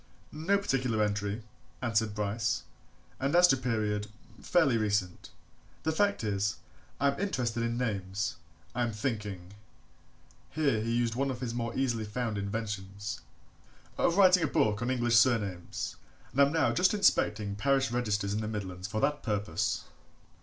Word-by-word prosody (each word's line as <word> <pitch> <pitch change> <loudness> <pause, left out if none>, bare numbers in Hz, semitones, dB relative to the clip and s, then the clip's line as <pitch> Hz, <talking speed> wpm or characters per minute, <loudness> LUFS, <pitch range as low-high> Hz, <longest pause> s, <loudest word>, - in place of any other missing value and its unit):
"No 165 +7 +1
particular 130 - 0
entry," 105 +1 -2 0.4
answered 110 -3 0
Bryce, 105 +2 -1 0.6
"and 140 +4 0
as 180 0 +8
to - - +6
period 110 -5 -1 0.3
fairly 160 -8 +3
recent. 105 -5 -1 0.5
The 160 - +1
fact 200 - +1
is, 105 -1 0 0.4
I 140 - +4
am 140 - -8
interested 125 - -1
in 115 0 -1
names. 100 -6 -2 0.4
I 125 - -1
am 120 -2 0
thinking" 105 -5 -4 1.0
here 140 -8 +1
he 115 +1 -1
used 120 -1 +1
one 135 +3 0
more 130 - -2
of - - -12
his 120 -2 -3 0.3
easily 120 -4 0
found 110 -1 -2
inventions 100 -1 -4 0.7
"of 170 - +1
writing 185 -2 +7
a 160 - +2
book 105 -6 +1
on 120 - -1
English 120 -2 +3
surnames, 105 -7 +1 0.4
and 140 - +4
am 160 - +3
just 180 +3 +3
now - - 0
inspecting 105 - +2
parish 135 +2 +2
registers 105 -4 0
in 105 - -1
the 105 - -3
Midlands 95 -4 -4
for 110 +1 -2
that 145 +1 +1
purpose." 100 -4 -1
115 Hz, 155 wpm, -30 LUFS, 105-130 Hz, 1.0 s, as